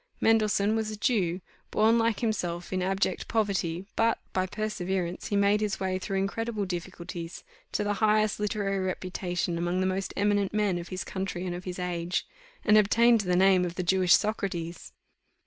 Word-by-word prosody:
Mendelssohn 215 -1 +3
was 220 -1 -1
a 215 - -6
Jew, 190 -6 +1 0.3
born 225 +2 +3
like 225 -2 +1
himself 180 -6 -2
in 185 - 0
abject 195 +2 -1
poverty, 195 -5 0
but, 230 0 +2 0.2
by 185 0 0
perseverance, 190 -4 -3
he 205 - -1
made 200 +1 +3
his 210 -2 -1
way 185 -1 -1
through 195 +1 -3
incredible 210 +2 -1
difficulties 175 -1 -6 0.3
to - - 0
the 205 0 0
highest 215 0 +3
literary 205 -2 -1
reputation 180 -2 -2
among 175 +1 0
the 185 - +1
most 190 +1 -1
eminent 205 0 +1
men 205 -4 +1
of 170 - -7
his 185 -3 -4
country 190 -1 -4
and 180 - -2
of 180 +1 -7
his 180 -1 -5
age; 175 -1 -2 0.4
and 215 -1 +7
obtained 230 +2 +4
the 180 -2 0
name 190 0 +5
of 175 -1 -3
the 185 - -2
Jewish 180 0 +5
Socrates. 180 -6 -3
195 Hz, 175 wpm, -28 LUFS, 180-210 Hz, 0.4 s, and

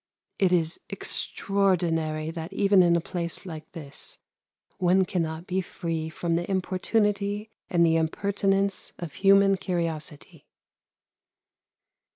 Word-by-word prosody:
It 190 -2 +3
is 165 -2 +2
extraordinary 170 -6 0
that 165 +1 -6
even 195 -1 +4
in 170 -1 +4
a - - +3
place 170 +2 -4
like 160 -3 -8
this 140 -4 -6 0.6
one 185 +1 +4
cannot 165 -2 -2
be 185 +1 0
free 165 -3 -4
from 165 +1 -1
the 175 +2 -3
importunity 205 +2 0 0.2
and 170 -1 +4
the 165 0 +3
impertinence 195 +4 0
of 170 -5 -7
human 195 +6 +5
curiosity. 165 -5 -4
180 Hz, 115 wpm, -26 LUFS, 165-195 Hz, 0.6 s, human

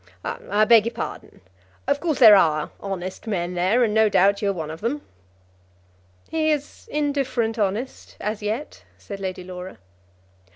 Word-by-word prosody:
"I 210 +2 0
beg 225 -1 +6
your 235 - -5
pardon. - - -7 0.4
Of 280 +1 +1
course 315 -2 -1
there 220 -5 +9
are 155 -5 +2
honest 190 +1 -6
men 180 -4 -2
there, 185 +8 +2
and 215 -3 +1
no 220 0 +4
doubt 200 +1 +3
you 200 - +1
are - - +3
one 160 -5 -5
of 160 - -9
them." 275 +7 -2 1.2
"He 315 -1 0
is 295 -2 -3
indifferent 275 -6 -1
honest, 215 +6 -3
as 210 +1 -3
yet," 220 +8 -4
said 200 -1 -8
Lady 185 -1 -4
Laura. 180 0 -8
210 Hz, 160 wpm, -23 LUFS, 190-245 Hz, 1.2 s, there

